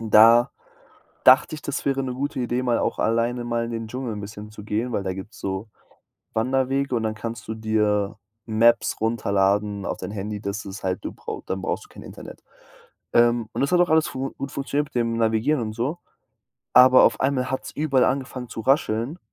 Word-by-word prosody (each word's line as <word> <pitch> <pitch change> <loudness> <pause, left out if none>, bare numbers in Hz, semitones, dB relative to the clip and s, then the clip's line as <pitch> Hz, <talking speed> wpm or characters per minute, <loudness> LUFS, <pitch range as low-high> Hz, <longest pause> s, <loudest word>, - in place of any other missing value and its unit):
da 115 +2 +6 0.7
dachte 130 +4 +6
ich, 155 - -10
das 140 - -4
wäre 135 -1 +1
'ne 130 -1 -3
gute 140 +1 -3
Idee, 125 +1 -1
mal 120 -2 +1
auch - - -1
alleine 120 +2 0
mal 115 0 -1
in 115 - -6
den 115 -1 -4
Dschungel 125 0 -4
'n 105 - -6
bisschen 105 +1 -9
zu 105 -1 -11
gehen, 110 +4 -2
weil 100 - -1
da 95 -1 -2
gibt's 95 +4 -9
so 95 +3 -4 0.6
Wanderwege 130 +3 0
und 115 - -1
dann 110 -1 -1
kannst 115 +1 -7
du 110 - -3
dir 105 -2 0 0.3
Maps 115 +1 +3
runterladen 100 -2 0
auf - - -3
dein - - -6
Handy, 105 0 -5
das 100 +1 -4
ist 95 0 -8
halt 95 -1 -2
du - - -3
brau - - -7
dann 95 0 -3
brauchst - - -3
du - - -22
kein - - -12
Internet. - - -11 0.7
Ähm, 120 -1 +3
und - - -2
das 140 - +1
hat 180 - +4
auch 175 - +2
alles 160 0 +4
fu 135 +1 -4
gut 135 0 -5
funktioniert 145 +1 -2
mit - - -28
dem 115 -1 0
Navigieren 115 +5 +1
und 110 -1 -4
so, 130 +10 -2 0.8
aber 130 +1 +8
auf 115 - +2
einmal 130 -1 0
hat's 130 - -3
überall 140 -4 +2
angefangen 130 -2 -2
zu 115 - -6
rascheln. 130 +2 +1
115 Hz, 205 wpm, -24 LUFS, 110-130 Hz, 0.8 s, aber